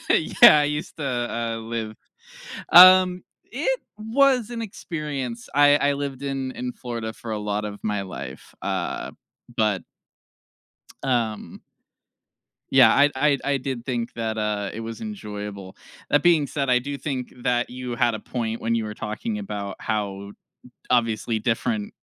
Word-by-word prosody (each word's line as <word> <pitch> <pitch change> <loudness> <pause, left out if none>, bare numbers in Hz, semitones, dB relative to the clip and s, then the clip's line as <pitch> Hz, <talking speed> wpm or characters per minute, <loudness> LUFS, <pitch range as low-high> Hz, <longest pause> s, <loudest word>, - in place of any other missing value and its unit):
Yeah, 155 -1 +7
I - - +2
used 150 +1 -3
to, 150 - -5
uh, 120 -3 -2
live 115 -1 -5 0.8
Um, 185 0 +8 0.3
it - - -1 0.2
was 245 +2 +2
an 235 -1 -5
experience, 150 - -5
I 145 0 +6
I 145 -1 +2
lived 140 -1 -5
in 135 -2 -3
in 125 0 -4
Florida 115 -2 -5
for 110 0 -8
a 105 - -2
lot 105 0 -2
of 105 -1 -6
my 105 -2 -1
life, 70 -8 -9
uh, - - -3 0.5
but 105 -4 +1 1.2
um 120 -5 -2 1.1
yeah, 125 -4 +7
I 145 +1 +5
I 140 +1 +3
I 140 -1 +1
did 130 -2 -5
think 120 -2 -3
that, 110 -1 -3
uh, 105 -2 -1
it 110 - -6
was 115 0 -7
enjoyable. 105 - -7 0.3
That 145 +1 +3
being 165 -5 +4
said, 140 -2 -2
I 125 -1 +4
do 140 +2 -5
think 135 -4 -4
that 120 -1 +1
you 125 -1 -5
had 120 -1 +2
a - - -5
point 115 -2 -4
when 115 +1 0
you 115 -1 -1
were 105 - -5
talking 210 - -4
about 100 - -5
how 100 -2 -3
d - - -21 0.5
obviously 115 -2 +1
different 210 - -2
120 Hz, 155 wpm, -24 LUFS, 110-145 Hz, 1.2 s, Um